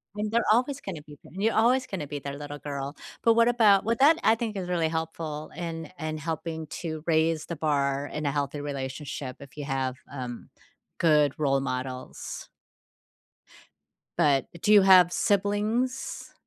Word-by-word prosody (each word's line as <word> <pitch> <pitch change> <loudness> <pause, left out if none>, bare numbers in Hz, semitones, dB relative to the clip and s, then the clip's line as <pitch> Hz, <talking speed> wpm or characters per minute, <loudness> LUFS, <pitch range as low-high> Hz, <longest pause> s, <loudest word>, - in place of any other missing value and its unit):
and 210 +1 -2
they're 235 0 +2
always 255 +5 +2
gonna 175 -6 -6
be 145 -1 -14
you're 205 +5 0
always 250 +4 +3
gonna 165 -7 -4
be 145 0 -5
their 140 0 -6
little 145 0 -7
girl, 140 0 -5 0.3
but 230 - +6
what 230 +1 +4
about 220 -5 +5
well, 230 +1 +2
that 310 +4 +6
I 220 - +5
think 225 -2 -4
is 185 -2 -4
really 170 -2 +1
helpful, 160 -1 -4
in 165 -2 -5
in 155 0 -3
helping 160 0 -4
to 160 -2 -4
raise 160 -1 +2
the 170 - -4
bar 140 -2 0
in 150 +1 -5
a 140 - +1
healthy 145 0 -2
relationship, 135 -1 -5
if 140 +1 -14
you 145 - -4
have, 135 -2 -1 0.2
um, 125 -4 -7 0.5
good 150 -4 +4
role 135 -3 +2
models. 130 -1 -5 1.7
But, 145 -5 +3
do 210 - +4
you 205 - +9
have 185 -2 +7
siblings? 210 +5 0
160 Hz, 165 wpm, -27 LUFS, 145-205 Hz, 1.7 s, you